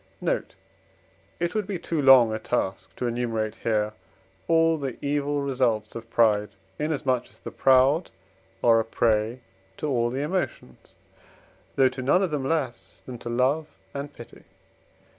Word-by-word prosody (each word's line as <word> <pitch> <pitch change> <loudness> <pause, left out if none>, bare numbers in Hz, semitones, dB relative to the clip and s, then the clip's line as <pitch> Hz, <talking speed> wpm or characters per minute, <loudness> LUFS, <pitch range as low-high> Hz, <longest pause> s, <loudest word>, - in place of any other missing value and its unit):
Note. - - -2 0.8
It 175 0 -1
would 215 -3 -1
be 200 -3 -2
too 165 -2 -2
long 130 -5 +7
a 110 - -2
task 95 -6 -3
to 125 - -3
enumerate 115 -3 -2
here 105 -1 0 0.5
all 165 -1 +3
the 135 -4 -4
evil 145 0 -1
results 120 -6 0
of 115 0 -8
pride, 105 -3 +3 0.3
inasmuch 135 -5 -1
as - - -17
the - - -8
proud 135 +5 +4 0.5
are 115 -1 +6
a - - +1
prey 115 +1 0 0.4
to 155 - -3
all 120 -4 +1
the 130 +3 -3
emotions, 150 - -4 0.8
though 135 -1 +5
to 130 0 -7
none 145 +9 +3
of 180 - -1
them 135 -3 -2
less 140 -7 -3
than 125 -2 -8
to 120 - -6
love 130 +6 +1 0.3
and 140 +1 -5
pity. 120 - -13
130 Hz, 155 wpm, -25 LUFS, 115-145 Hz, 0.8 s, long